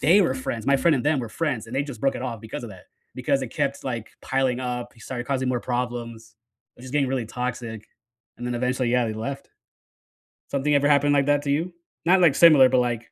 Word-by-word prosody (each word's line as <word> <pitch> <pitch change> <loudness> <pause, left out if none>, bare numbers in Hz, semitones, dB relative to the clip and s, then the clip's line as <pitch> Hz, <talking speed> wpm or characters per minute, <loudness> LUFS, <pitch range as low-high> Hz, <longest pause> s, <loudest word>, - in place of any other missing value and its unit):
they 175 +8 +5
were 135 -6 +1
friends- 120 -3 -4
my 140 0 +4
friend 165 +3 +3
and 130 0 -2
them 150 -2 +2
were 120 -3 -4
friends- 135 -6 -2
and 125 +4 -6
they 140 - +2
just 140 -7 -8
broke 135 - +1
it - - -5
off 115 -4 -4
because 110 +2 -7
of 110 - -8
that 95 -2 -13 0.3
because 135 +2 0
it 125 - -4
kept, 140 0 -2
like, 120 -4 -4
piling 130 -2 0
up, 125 -1 -4
he 115 - -20
started 120 +1 -6
causing 130 -2 -1
more 125 -2 0
problems, 120 -2 -4 0.5
just 130 +1 -10
getting 140 -3 +2
really 130 -4 -2
toxic, 115 -2 -5 0.5
and 120 - -6
then 120 - -2
eventually, 125 0 0
yeah, 125 -1 +2
they 110 - -2
left. 135 +5 -6 1.0
Something 145 +1 +1
ever 145 0 +3
happened 145 0 +4
like 140 -1 +3
that 145 0 +3
to 140 - -1
you? 170 +5 -1 0.3
Not, 185 +2 +5
like, 155 -6 +5
similar, 150 -6 +7
but, 130 0 +3
like, 120 -2 -2
130 Hz, 235 wpm, -24 LUFS, 120-140 Hz, 1.0 s, similar